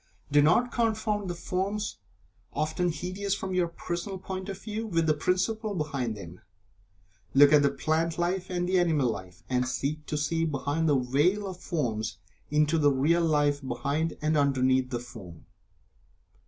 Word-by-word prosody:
Do 145 Hz, 0 st, +6 dB
not 180 Hz, +11 st, +3 dB
confound 215 Hz, -4 st, 0 dB
the 175 Hz, -, -3 dB
forms 195 Hz, -, -2 dB, 0.6 s
(often 160 Hz, +3 st, 0 dB
hideous 185 Hz, +5 st, -2 dB
from 190 Hz, -1 st, -4 dB
your 180 Hz, -1 st, +2 dB
personal 175 Hz, +3 st, -5 dB
point 190 Hz, +1 st, -6 dB
of 195 Hz, -, -4 dB
view) 220 Hz, +2 st, -4 dB
with 165 Hz, -5 st, +1 dB
the 155 Hz, -, +4 dB
principle 200 Hz, +7 st, 0 dB
behind 140 Hz, -9 st, -2 dB
them. 85 Hz, -2 st, -10 dB, 0.9 s
Look 145 Hz, +2 st, +8 dB
at 150 Hz, -, +7 dB
the 140 Hz, -, +4 dB
plant 160 Hz, +2 st, -1 dB
life, 175 Hz, +2 st, -1 dB
and 175 Hz, -1 st, -1 dB
the 185 Hz, 0 st, +3 dB
animal 155 Hz, -8 st, +2 dB
life, 90 Hz, -4 st, -9 dB
and 125 Hz, 0 st, 0 dB
seek 150 Hz, +4 st, -3 dB
to 150 Hz, -, -2 dB
see 165 Hz, +3 st, 0 dB
behind 150 Hz, +1 st, 0 dB
the 145 Hz, -, +4 dB
veil 145 Hz, +11 st, +1 dB
of 185 Hz, -2 st, -6 dB
form 120 Hz, -13 st, -2 dB, 0.5 s
into 150 Hz, +2 st, +2 dB
the 145 Hz, -1 st, +5 dB
real 150 Hz, +6 st, +2 dB
Life 145 Hz, -3 st, +2 dB
behind 140 Hz, +5 st, -2 dB
and 155 Hz, +1 st, +2 dB
underneath 130 Hz, -3 st, +2 dB
the 120 Hz, -2 st, -2 dB
form. 110 Hz, -9 st, -11 dB
160 Hz, 165 wpm, -28 LUFS, 140-185 Hz, 0.9 s, Look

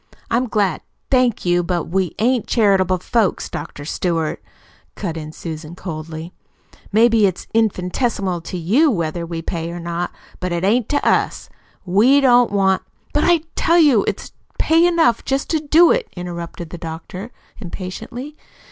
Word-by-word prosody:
I'm 245 Hz, +2 st, +2 dB
glad 205 Hz, -6 st, 0 dB, 0.2 s
" -, -, -48 dB
"Thank 250 Hz, -6 st, +2 dB
you, 175 Hz, 0 st, +3 dB
but 175 Hz, -1 st, -1 dB
we 185 Hz, 0 st, -1 dB
ain't 240 Hz, +1 st, +1 dB
charitable 195 Hz, -5 st, +3 dB
folks, 215 Hz, +2 st, 0 dB
Dr. 145 Hz, -, -7 dB
Stewart," 165 Hz, -1 st, -1 dB, 0.5 s
cut 175 Hz, -6 st, -4 dB
in 155 Hz, -1 st, -6 dB
Susan 160 Hz, 0 st, -7 dB
coldly. 160 Hz, -1 st, -7 dB, 0.6 s
"Maybe 225 Hz, 0 st, +5 dB
it 185 Hz, -, -2 dB
is -, -, -10 dB
infinitesimal 195 Hz, -3 st, 0 dB
to 180 Hz, +2 st, -6 dB
you 225 Hz, -, +3 dB
whether 170 Hz, -, -2 dB
we 165 Hz, -1 st, -5 dB
pay 165 Hz, -1 st, -3 dB
or 175 Hz, +1 st, -6 dB
not, 170 Hz, +1 st, -3 dB, 0.3 s
but't 175 Hz, -1 st, -2 dB
ain't 220 Hz, +4 st, +2 dB
to 290 Hz, -, 0 dB
us. -, -, +1 dB, 0.4 s
We 220 Hz, +10 st, +5 dB
don't 245 Hz, -4 st, +5 dB
want 190 Hz, -2 st, +2 dB, 0.2 s
" -, -, -36 dB
"But -, -, +2 dB
I 345 Hz, -2 st, +4 dB
tell 335 Hz, -, +3 dB
you 285 Hz, -, +5 dB
it's -, -, -3 dB, 0.3 s
pay 330 Hz, +2 st, +4 dB
enough 335 Hz, -9 st, +2 dB
just 270 Hz, +1 st, -1 dB
to 320 Hz, -, +2 dB
do 315 Hz, +3 st, +5 dB
it," -, -, +1 dB
interrupted 170 Hz, -1 st, -6 dB
the 175 Hz, -, -7 dB
doctor 170 Hz, +5 st, -7 dB, 0.3 s
impatiently. 225 Hz, -, -7 dB
190 Hz, 160 wpm, -20 LUFS, 170-245 Hz, 0.6 s, Maybe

